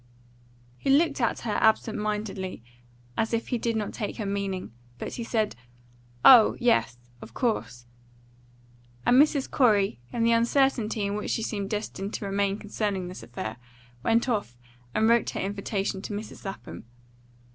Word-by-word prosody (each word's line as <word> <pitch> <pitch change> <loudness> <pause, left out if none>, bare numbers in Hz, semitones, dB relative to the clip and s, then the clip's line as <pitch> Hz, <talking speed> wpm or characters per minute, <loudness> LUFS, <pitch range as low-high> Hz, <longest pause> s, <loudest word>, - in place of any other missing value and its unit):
He - - -2
looked 285 0 +3
at 235 - 0
her 220 -3 -1
absent 220 0 +3
mindedly, 210 - -3 0.5
as 225 +1 0
if 230 - -3
he 245 - 0
did 230 0 -1
not 215 -2 -2
take 210 -4 -4
her 215 - -3
meaning. 195 - -3 0.2
But - - -6
he 235 - -4
said, 220 - 0 0.7
"Oh 240 -5 +9
yes, 120 - +2 0.2
of - - -12
course," 120 - -2 1.2
and 250 +3 +7
Mrs. 290 -2 +2
Corey, 205 - +3
in 235 - -1
the 230 - +4
uncertainty 235 -2 +2
in 200 - -1
which 210 0 -3
she 225 - -1
seemed 200 -3 -3
destined 205 -1 -4
to - - -4
remain 200 0 0
concerning 205 -3 -3
this 180 - -8
affair, 115 -1 -6 0.4
went 230 - +2
off 205 - -2 0.4
and 220 - +3
wrote 235 0 +3
her - - -4
invitation 200 0 -2
to 210 - -6
Mrs. 210 +1 -7
Lapham. 195 -10 -7
210 Hz, 155 wpm, -27 LUFS, 195-230 Hz, 1.2 s, Oh